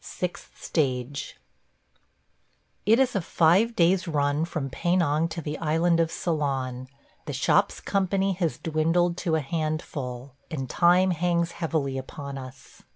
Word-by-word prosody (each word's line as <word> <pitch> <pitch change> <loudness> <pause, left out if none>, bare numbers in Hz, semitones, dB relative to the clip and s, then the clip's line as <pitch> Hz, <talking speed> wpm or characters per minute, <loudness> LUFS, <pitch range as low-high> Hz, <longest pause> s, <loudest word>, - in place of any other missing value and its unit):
SIXTH 180 -1 -5
STAGE 140 -2 -2 1.5
IT 225 +2 +6
is 260 -3 +2
a 195 - +1
five 180 +8 +3
days' 180 +2 +3
run 145 0 +1
from 160 -5 -3
Penang 165 -2 +1
to 165 0 -6
the 150 0 -4
island 165 +2 +2
of 165 -1 +2
Ceylon; 135 -7 -2 0.4
the - - -3
shop's - - +2
company 195 0 0
has 170 -8 -1
dwindled 165 +2 +1
to 165 -3 0
a 160 - +1
handful, 140 -4 -4 0.2
and 140 -6 -4
time 180 +5 +4
hangs 170 0 0
heavily 150 -6 -2
upon 140 +1 -7
us. 130 0 -12
160 Hz, 135 wpm, -26 LUFS, 140-175 Hz, 1.5 s, IT